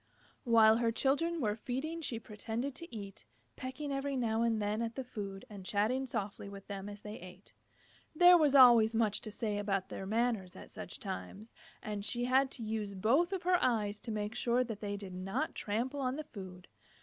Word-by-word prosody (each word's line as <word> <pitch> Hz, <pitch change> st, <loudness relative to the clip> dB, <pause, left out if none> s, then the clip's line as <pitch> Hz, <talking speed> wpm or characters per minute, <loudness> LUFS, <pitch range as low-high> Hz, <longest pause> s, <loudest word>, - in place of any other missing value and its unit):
While 225 Hz, -2 st, +6 dB
her 230 Hz, -1 st, +2 dB
children 290 Hz, +8 st, +1 dB
were 210 Hz, -6 st, 0 dB
feeding 270 Hz, +9 st, -4 dB
she 250 Hz, -7 st, -3 dB
pretended 225 Hz, +4 st, -4 dB
to 335 Hz, +5 st, -9 dB
eat, 200 Hz, -2 st, -8 dB, 0.3 s
pecking 270 Hz, +3 st, -5 dB
every 275 Hz, 0 st, -2 dB
now 225 Hz, -2 st, +1 dB
and 230 Hz, -2 st, +2 dB
then 210 Hz, +2 st, -1 dB
at 230 Hz, 0 st, -3 dB
the 265 Hz, -, -3 dB
food, 200 Hz, -4 st, -6 dB
and 205 Hz, -5 st, -9 dB
chatting 230 Hz, +7 st, 0 dB
softly 205 Hz, -4 st, -4 dB
with 200 Hz, -1 st, -10 dB
them 200 Hz, 0 st, -6 dB
as 205 Hz, 0 st, -10 dB
they 210 Hz, 0 st, -7 dB
ate. 180 Hz, +2 st, -13 dB, 0.6 s
There 355 Hz, +2 st, +8 dB
was 300 Hz, -5 st, +4 dB
always 235 Hz, -4 st, +8 dB
much 215 Hz, -2 st, +1 dB
to 215 Hz, -, -6 dB
say 205 Hz, -1 st, -2 dB
about 195 Hz, -2 st, -1 dB
their 190 Hz, -, -6 dB
manners 220 Hz, -4 st, 0 dB
at -, -, -11 dB
such -, -, -8 dB
times, 145 Hz, -, -7 dB, 0.3 s
and 210 Hz, -1 st, -4 dB
she 240 Hz, +3 st, 0 dB
had 265 Hz, +2 st, +3 dB
to 245 Hz, -, -7 dB
use 215 Hz, -2 st, -3 dB
both 270 Hz, -, +3 dB
of 380 Hz, -2 st, -3 dB
her 360 Hz, 0 st, +3 dB
eyes 210 Hz, -4 st, +1 dB
to 230 Hz, -, -5 dB
make 210 Hz, 0 st, -2 dB
sure 245 Hz, +1 st, +2 dB
that 225 Hz, -4 st, -6 dB
they 205 Hz, -1 st, -3 dB
did 195 Hz, -2 st, -8 dB
not 185 Hz, +1 st, -2 dB
trample 240 Hz, +7 st, -2 dB
on 255 Hz, -1 st, 0 dB
the 310 Hz, -, -4 dB
food. 185 Hz, -7 st, -10 dB
225 Hz, 200 wpm, -33 LUFS, 205-255 Hz, 0.6 s, There